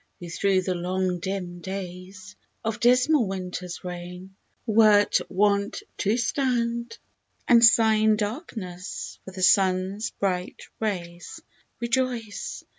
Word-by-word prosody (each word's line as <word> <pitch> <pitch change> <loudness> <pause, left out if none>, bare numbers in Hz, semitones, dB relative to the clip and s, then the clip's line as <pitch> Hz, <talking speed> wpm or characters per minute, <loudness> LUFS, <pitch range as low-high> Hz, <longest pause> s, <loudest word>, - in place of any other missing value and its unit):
who 175 - -8
through 190 +2 +1
the 185 - -1
long 180 +1 -1
dim 180 -1 -4
days' 190 +2 -8 0.3
Of 225 +1 -2
dismal 250 +1 +4
Winter's 180 -2 -5
reign, 180 +1 -8 0.3
wert 215 -2 +5
wont 200 +1 +1 0.2
to 210 +4 +1
stand 235 -2 -1 0.5
And 235 -1 +6
sigh 225 -2 +6
in 215 0 +4
darkness 210 - -5
for - - -7
the 185 0 -5
sun's 190 +3 +2
bright 180 -2 -3 0.2
rays 175 - -4 0.2
— - - -42
Rejoice 235 -3 -2
200 Hz, 115 wpm, -25 LUFS, 185-225 Hz, 0.5 s, And